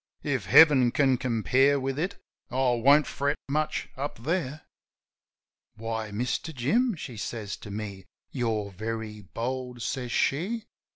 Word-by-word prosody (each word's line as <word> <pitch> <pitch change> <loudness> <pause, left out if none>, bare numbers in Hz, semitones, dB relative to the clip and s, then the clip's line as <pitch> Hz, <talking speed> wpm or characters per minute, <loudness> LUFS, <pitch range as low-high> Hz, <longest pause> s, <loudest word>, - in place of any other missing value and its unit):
If - - -1
Heaven 140 -6 +7
can 135 0 +3
compare 130 +3 +2
with 135 +1 -2
it 180 +5 -2 0.3
I 130 -1 +2
won't 140 +5 +5
fret 140 +1 -1
much 150 +2 -1
up 140 +2 -4
there. 155 -1 -1 1.1
"Why, 110 0 -4
Mister 125 +9 -2
Jim," 215 - +1
she 125 -7 -8
says 105 -1 -4
to - - -10
me. 100 -2 -6 0.3
"You're 110 -5 -1
very 110 +1 -5
bold," 125 +4 -4
says 125 -2 -3
she. 200 - 0
125 Hz, 130 wpm, -27 LUFS, 115-145 Hz, 1.1 s, Heaven